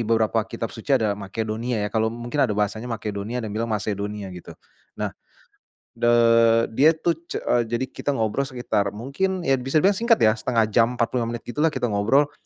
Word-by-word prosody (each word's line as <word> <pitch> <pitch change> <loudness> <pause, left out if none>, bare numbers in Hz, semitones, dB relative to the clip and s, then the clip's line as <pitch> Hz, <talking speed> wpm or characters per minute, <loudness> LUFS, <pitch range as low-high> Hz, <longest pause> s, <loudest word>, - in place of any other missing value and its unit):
beberapa 115 0 +2
kitab 115 - -5
suci 130 +4 +1
ada 110 -4 +1
Makedonia 110 +4 -3
ya, - - -1
kalau 110 0 +2
mungkin 120 +5 -4
ada 105 -6 +2
bahasanya 105 +3 -1
Makedonia, 105 0 -4
ada 125 - -3
yang 105 - -5
bilang 115 +2 -2
Macedonia 105 -2 -3
gitu. 90 -1 -11 0.4
Nah, - - -3 0.8
de 120 - -1 0.7
dia 150 +7 +5
tuh 165 0 -1
ce - - -5 0.3
jadi 120 +3 -1
kita 145 -1 -2
ngobrol 115 +5 0
sekitar 110 -6 -2
mungkin, 170 - -2
ya 135 -3 +2
bisa 135 +4 +1
dibilang 195 0 +3
singkat 230 0 +4
ya, 110 - +6
0,5 115 -3 +1
jam, 120 +2 +3
45 120 0 -1
menit 115 - -8
gitulah, 150 +6 0
kita 125 -7 -1
ngobrol. 135 +9 +2
115 Hz, 185 wpm, -23 LUFS, 110-135 Hz, 0.8 s, ya